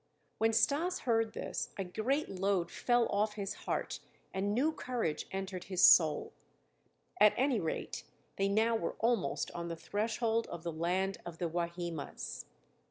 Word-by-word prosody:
When 225 +1 +4
Stas 290 +11 +2
heard 225 -2 +1
this, - - -3
a 195 - -1
great 240 +11 -1
load 190 -2 0
fell 240 -1 +2
off 210 +1 +1
his 200 -2 -3 0.2
heart - - -1 0.3
and 195 +2 0
new 265 +9 +2
courage 245 - -2
entered 190 -1 -4
his 185 -1 0
soul. 155 -3 +6 0.9
At 210 - +7
any 260 -3 +2
rate, 160 -4 -3 0.3
they 195 - +1
now 220 +3 +3
were 225 - -2
almost 230 -4 0
on 170 0 -5
the 170 - -3
threshold 225 +5 -1
of 170 - -7
the 170 -1 -3
land 185 +4 0
of 170 -1 -8
the 175 - -1
Wahimas. 170 -2 -4
200 Hz, 155 wpm, -33 LUFS, 175-230 Hz, 0.9 s, At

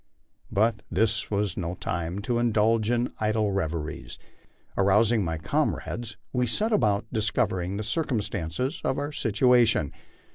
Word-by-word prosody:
But 110 +2 +2
this 110 +4 +1
was 100 -3 0
no 90 -1 -3
time 85 +3 -3
to 120 +1 0
indulge 115 -1 +2
in 120 0 0
idle 110 -1 +1
reveries. 80 -5 -3 0.6
Arousing 105 +3 +3
my 80 -2 -2
comrades, 110 +7 -2 0.2
we 125 -1 +1
set 215 - +1
about 105 - +2
discovering 100 -4 0
the 105 - -3
circumstances 115 - -2
of 135 - 0
our 145 +1 -2
situation. 120 - +3
110 Hz, 130 wpm, -26 LUFS, 95-120 Hz, 0.6 s, Arousing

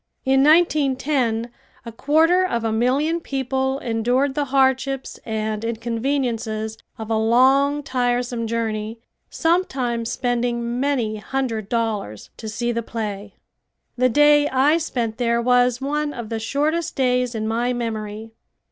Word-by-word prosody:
In 270 0 +4
1910 275 -7 +2 0.3
a 230 - -6
quarter 320 +9 +3
of 235 -11 -1
a 225 - 0
million 270 +9 +1
people 265 -2 -2
endured 245 +3 0
the 290 +1 -1
hardships 265 0 0
and 215 -1 -2
inconveniences 230 -1 -2 0.2
of 220 0 -6
a - - +2
long, 265 +6 +3
tiresome 245 -2 -1
journey, 220 -1 -3 0.3
sometimes 260 -9 0
spending 240 -1 -1
many 250 -6 0
hundred 225 -2 -3
dollars, 215 - -3
to 220 - -6
see 235 +3 -2
the 235 0 -1
play. 210 -3 -5 0.6
The 255 +1 +2
day 295 +2 +5
I 280 +5 +3
spent 235 -8 -3
there 235 -1 +1
was 245 0 +3
one 295 +2 -1
of 235 -3 -6
the 225 -1 -3
shortest 295 +8 -1
days 250 -2 +1
in 220 0 -2
my 235 +2 0
memory. 220 -2 -4
245 Hz, 130 wpm, -22 LUFS, 225-275 Hz, 0.6 s, day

